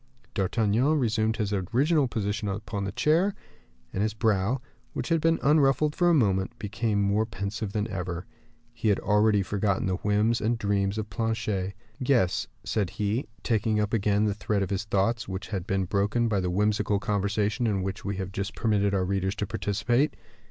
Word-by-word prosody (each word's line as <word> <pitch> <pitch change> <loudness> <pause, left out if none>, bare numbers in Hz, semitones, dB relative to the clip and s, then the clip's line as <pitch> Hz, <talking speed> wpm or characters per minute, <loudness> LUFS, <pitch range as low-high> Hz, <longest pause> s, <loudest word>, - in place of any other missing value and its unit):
D'Artagnan 110 - +2
resumed 110 -4 +1
his 105 -1 -1
original 130 - +2
position 105 -2 -2
upon 100 0 -3
his 95 - -5
chair, 175 +7 +2 0.6
and 95 - -1
his 110 0 0
brow, 110 +2 +1 0.3
which - - -3
had 165 -2 +2
been 165 +1 +3
unruffled 150 0 +3
for 175 -1 +3
a - - +5
moment, 100 -3 +1
became 110 -1 -1
more 100 +2 +2
pensive 105 -1 -4
than 105 +1 -1
ever. 90 -3 -4 0.5
He 115 -1 -3
had 100 - +3
already 105 0 +3
forgotten 100 0 0
the 95 -1 0
whims 105 +4 +1
and 115 +2 +1
dreams 100 -1 0
of 105 -1 -4
Planchet. 110 -4 -1 0.2
"Yes," 125 -9 +2 0.2
said 100 -5 -1
he, 105 +6 -2 0.2
taking 110 -1 +1
up 105 +1 -1
again 105 -1 +2
the 105 - +1
thread 105 0 -1
of 95 - -4
his 100 +1 -1
thoughts, 105 +3 0
which 95 +1 -5
had 95 -3 -3
been 95 -1 0
broken 105 +5 +1
by 105 -3 +1
the 90 -1 -1
whimsical 105 +2 +1
conversation 105 +3 0
in 100 -3 0
which 95 +2 -4
we 100 0 -2
have 95 -1 -4
just 100 +2 -4
permitted 100 -3 +1
our 95 -1 +1
readers 95 +1 -1
to 105 - -2
participate. 120 +9 0
105 Hz, 180 wpm, -27 LUFS, 100-115 Hz, 0.6 s, a